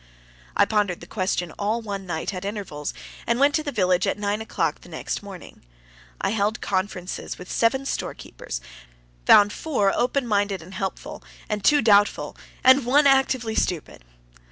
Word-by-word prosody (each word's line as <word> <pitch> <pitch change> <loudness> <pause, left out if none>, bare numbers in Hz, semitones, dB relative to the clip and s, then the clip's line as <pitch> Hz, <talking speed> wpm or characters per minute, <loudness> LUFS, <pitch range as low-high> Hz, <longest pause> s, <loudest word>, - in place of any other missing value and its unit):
I - - +6
pondered 205 -5 0
the - - -11
question 185 -4 -2
all 215 +3 0
one 200 -3 -5
night, 170 +3 -3
at 185 0 -5
intervals, 195 -8 -4 0.4
and 235 +1 +1
went 285 +1 +4
to 315 - +2
the 295 -2 -4
village 185 -5 +2
at - - 0
nine 205 +1 -1
o'clock 220 - -2
the - - -15
next - - -4
morning. 195 -3 -11 0.6
I - - 0
held 215 +1 0
conferences 190 -1 -3
with 180 - -9
seven 265 +4 +1
storekeepers; - - -5 0.7
found 205 0 +7
four 210 -11 0
open 255 +2 +1
minded 200 -5 0
and 185 +4 -12
helpful, 195 -1 -5 0.4
two 290 +7 +4
doubtful, 205 -2 +3 0.3
and 260 +1 +7
one 280 +5 +4
actively 265 -4 +3
stupid. 170 - -2
205 Hz, 155 wpm, -24 LUFS, 190-240 Hz, 0.7 s, found